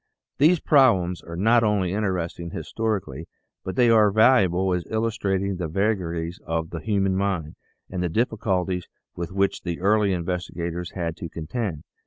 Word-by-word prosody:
These 160 +4 +5
problems 95 - +3
are 85 - -9
not 115 +6 +4
only 100 -4 +1
interesting 90 -4 -2
historically 85 -4 -3 0.4
but 95 - -5
they 120 0 +4
are 110 -2 +6
valuable 95 -4 +4
as 90 -1 -1
illustrating 100 -4 -1
the 90 -2 -3
vagaries 85 -2 -1
of 80 0 -3
the 85 - -4
human 100 0 0
mind 95 -6 -1 0.3
and 90 -1 -4
the 90 - 0
difficulties 95 -4 -1 0.3
with 85 0 -5
which 100 +1 0
the 85 -2 -4
early 100 +1 +3
in 85 -2 -2
vestigators 90 -1 -4
had 85 -3 -2
to 85 - -6
contend. 80 +1 -4
95 Hz, 155 wpm, -24 LUFS, 85-105 Hz, 0.4 s, are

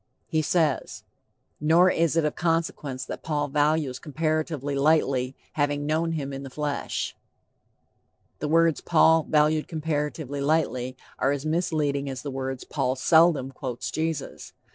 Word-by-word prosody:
He 160 -2 0
says: 155 -2 0 0.6
"Nor 170 +5 +5
is 165 -1 +1
it 165 - +3
of 150 - 0
consequence 165 -6 -1
that - - -7
Paul 150 -2 -1
values 145 -2 +1
comparatively 155 -2 -2
lightly, 140 -3 +2 0.2
having 145 -1 0
known 160 +2 0
him 140 -3 -3
in 135 - -5
the 135 - -7
flesh." 145 +1 -3 1.2
The 150 - -2
words 165 0 +3
"Paul 160 -1 +5
valued 155 0 +3
comparatively 150 -3 -3
lightly" 130 -4 0 0.2
are 135 - +2
as 145 +1 -3
misleading 155 -4 0
as 130 -2 -6
the 145 - -4
words 130 -1 -4
"Paul 130 -3 -1
seldom 160 -1 +4
quotes 125 -2 -5
Jesus." 160 -2 -4
150 Hz, 140 wpm, -26 LUFS, 140-160 Hz, 1.2 s, Nor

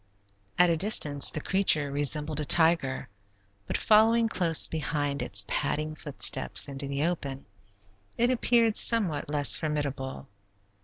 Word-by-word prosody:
At 180 -1 +3
a - - 0
distance 155 -6 +3
the - - -4
creature 155 -5 0
resembled 150 +1 -1
a - - -3
tiger, 160 -4 +1 0.6
but - - -3
following 225 +1 +2
close 170 -6 +3
behind 145 -3 -4
its 100 0 +1
padding 155 +1 -4
footsteps 140 - +1
into 140 0 -8
the 140 +1 -4
open, 140 -6 -6 0.7
it 240 +2 0
appeared 235 -3 0
somewhat 195 -12 0
less 145 -2 +3
formidable. 140 -4 -5
150 Hz, 125 wpm, -26 LUFS, 140-180 Hz, 0.7 s, At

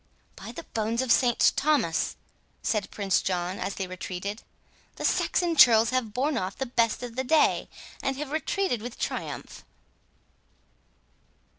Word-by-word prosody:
"By - - -9
the 335 - -8
bones 230 0 -1
of 255 - 0
St 240 -1 +4
Thomas," 275 - +1 0.5
said 210 -4 0
Prince 195 -3 0
John, 180 0 -2
as 195 - -3
they 195 - -3
retreated, 185 +3 -5 0.5
"the - - -4
Saxon 345 -2 +1
churls 230 -5 +7
have 255 -4 -1
borne 265 +3 0
off 185 +1 -4
the 265 - -2
best 235 -2 0
of 240 -2 -7
the 260 - -1
day, 305 +4 +3 0.3
and 270 -1 -1
have 290 -1 -5
retreated 315 - -1
with 240 +1 -7
triumph!" - - -5
235 Hz, 145 wpm, -27 LUFS, 200-270 Hz, 0.5 s, churls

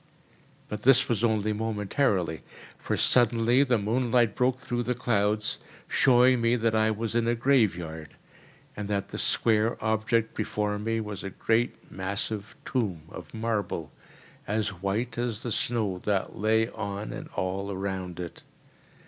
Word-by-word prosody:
But 105 0 -5
this 135 +2 +6
was 115 -2 0
only 110 -2 +2
momentarily; 105 - 0 0.4
for - - -2
suddenly 120 +1 +4
the 125 -4 +2
moonlight 120 +1 +2
broke 125 +1 +1
through 120 -2 -2
the 125 +1 -1
clouds, 105 -3 0 0.3
showing 125 -1 +4
me 115 +1 +3
that 115 -2 +1
I 110 0 +3
was 110 +1 -2
in 115 0 +1
a 120 - +2
graveyard, 90 - 0 0.6
and 105 -1 -4
that 100 -1 -2
the - - -6
square 110 +1 +2
object 110 +1 0
before 105 -1 -2
me 115 +2 -1
was 105 -2 -6
a 100 - -4
great 115 +4 -1
massive 100 +2 -3
tomb 100 - -1
of - - -10
marble, 110 -8 -2 0.6
as 105 0 0
white 100 +6 -3
as 120 -2 -2
the 120 - -3
snow 105 -6 0
that 100 -2 0
lay 110 +1 +2
on 100 -2 -5
and - - -7
all 95 +2 -2
around 95 -2 -4
it. 85 -2 -7
110 Hz, 150 wpm, -27 LUFS, 100-120 Hz, 0.6 s, this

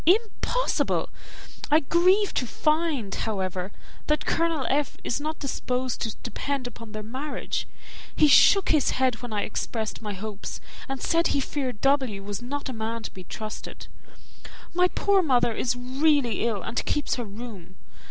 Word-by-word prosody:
Impossible! 450 +5 +2 0.6
I 305 +2 +5
grieve 365 +7 +3
to 250 - 0
find, 305 -8 0
however, 190 -3 -2 0.4
that 300 0 +1
Colonel 330 -5 +1
F. 285 0 0
is 265 - -1
not 310 +1 -3
disposed 255 -2 -2
to 225 -2 -2
depend 275 +2 -2
upon 230 -2 -8
their 215 0 -5
marriage: 260 +7 -3 0.5
he 305 - +6
shook 380 +7 +7
his 305 -4 +4
head 255 -3 +1
when 245 -2 -6
I 210 -1 0
expressed 220 0 -3
my 210 -2 -4
hopes, 205 +1 -6 0.3
and 270 -1 -3
said 335 +1 +3
he - - +1
feared 260 -5 -3
W. 260 -8 +2
was 205 +2 -4
not 280 +4 -4
a 260 - -4
man 225 0 -3
to - - -5
be 185 -1 -10
trusted. 215 +3 -7 0.9
My 360 +1 +4
poor 395 +1 +3
mother 250 -7 +3
is 245 +2 0
really 255 -2 +2
ill, 210 -5 -1
and 230 - -2
keeps 295 -2 0
her 240 - -3
room. 205 -4 -9
255 Hz, 160 wpm, -26 LUFS, 220-300 Hz, 0.9 s, shook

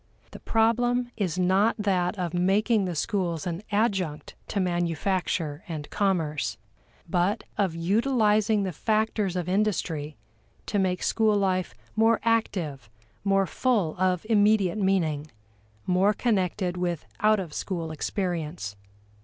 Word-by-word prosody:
The - - -10
problem 240 +2 +1
is 185 -5 -2
not 190 +4 +3
that 190 -2 0
of 175 -2 -3
making 200 +4 +2
the 180 -2 -3
schools 170 -2 -1
an 175 0 -3
adjunct 195 -8 0
to 205 - -2
manufacture 175 -2 -1
and 155 -4 -5
commerce, 165 -7 0 0.5
but 180 +6 +1
of 190 -5 0
utilizing 215 +2 +2
the 190 - -2
factors 215 +1 0
of 180 -2 -2
industry 175 -7 -1 0.5
to 205 - -1
make 185 -1 0
school 215 -2 +2
life 185 -2 0 0.2
more 225 +1 +4
active, 175 - -1 0.3
more 195 -1 +3
full 205 -7 0
of 185 0 +1
immediate 210 -3 +3
meaning, 160 -7 0 0.6
more 190 +3 +3
connected 190 -5 0
with 175 -3 -2
out 215 0 +4
of 170 -6 -6
school 165 -3 -3
experience. 160 - -3
190 Hz, 125 wpm, -26 LUFS, 170-210 Hz, 0.6 s, more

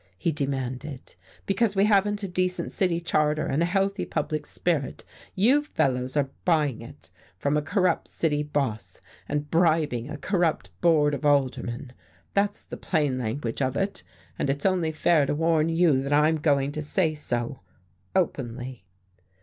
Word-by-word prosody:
he 165 - 0
demanded. 135 -1 -4 0.3
"Because 200 +1 +1
we 195 +1 +4
haven't 205 0 +2
a - - -1
decent 185 0 -1
city 180 -4 0
charter, 155 -2 +1
and 145 - 0
a 170 - +3
healthy 195 +2 0
public 155 -1 -3
spirit, 160 -6 -2 0.3
you 245 +10 +4
fellows 130 - -1
are 140 -2 +1
buying 150 -9 +1
it 80 -8 -13 0.3
from 140 +8 0
a 150 - +2
corrupt 180 +2 +1
city 150 -3 0
boss, 140 -7 -3 0.3
and 145 0 -2
bribing 155 -7 +2
a 150 - -5
corrupt 165 - 0
board 150 -3 +4
of 145 - -4
aldermen. 135 -2 0 0.4
That's 200 0 0
the - - -8
plain 145 -7 0
language 120 +1 -3
of 130 0 0
it. 195 +1 -2 0.4
And - - 0
it's 140 +1 -2
only 180 -4 +2
fair 155 -2 +3
to - - 0
warn 160 0 +2
you 165 -5 +3
that 140 +2 -1
I'm 155 +2 +4
going 140 -2 +1
to 155 - -4
say 155 +2 0
so, 125 -3 -3 0.6
openly." 130 - -2
150 Hz, 155 wpm, -26 LUFS, 135-175 Hz, 0.6 s, we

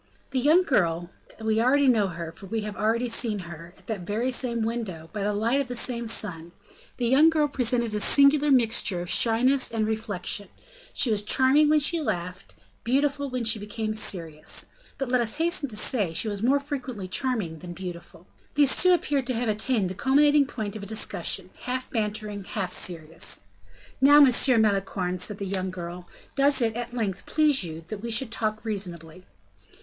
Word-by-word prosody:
The 265 - 0
young 310 +8 +4
girl 175 - 0 0.3
we 220 0 0
know 250 -4 +3
her, 170 -2 -6
for 195 - -13
we 225 +3 -2
have 210 -1 -6
already 230 +3 0
seen 230 -2 -1
her, 170 +2 -11
at - - -24
that 220 -3 -4
very 215 +8 -2
same 235 -2 -2
window, 215 -9 -4
by 210 - -4
the 205 +1 0
light 230 +7 +1
of 275 - -5
that 245 - -5
same 235 -1 -2
sun 175 -7 -2 0.4
the 245 - -1
young 275 +7 +5
girl 310 -2 +2
presented 240 -4 0
a 210 - -1
singular 280 +5 +4
mixture 225 -8 +3
of 175 - -2
shyness 255 +4 +3
and 225 -1 0
reflection; 210 -2 -2 0.4
she 240 - +1
was 210 -1 +2
charming 265 +7 +4
when 305 0 +4
she 330 +3 +3
laughed, 180 - -4 0.3
beautiful 280 +3 0
when 250 -1 -3
she 220 -1 +1
became 215 +1 -4
serious; 165 -7 -3 0.3
but, 270 - -3
let 250 0 +2
us 225 +1 -1
hasten 325 -3 -1
to 215 - -6
say, 210 -5 -1
she 165 - +1
was 205 -2 -4
more 265 +5 +3
frequently 255 -8 -6
charming 185 -6 -2
than 175 0 -8
beautiful. 175 -1 -9 0.3
These 290 -2 +4
two 365 0 +6
appeared 280 -6 -1
to 255 - 0
have 235 0 -1
attained 215 -1 +1
the 180 - -4
culminating 285 +6 +3
point 215 -6 -5
of 215 - -6
a 200 - -8
discussion 220 +1 -1
half 255 +1 -3
bantering, 210 -2 -2
half 190 -3 -3
serious. 165 -2 -4 0.6
"Now, 290 +2 +7
Monsieur 255 -2 +5
Malicorne," 195 -4 0
said 200 +3 -4
the 200 - -5
young 190 -1 -2
girl, 175 -1 -7 0.3
"does 280 0 +3
it, 225 -3 0
at 240 0 -5
length, 200 -5 -3
please 300 -5 +2
you 165 -1 -7
that 210 -2 -6
we 235 - -5
should 230 +1 0
talk 215 -1 -2
reasonably?" 180 -5 -6
220 Hz, 185 wpm, -26 LUFS, 195-260 Hz, 0.6 s, Now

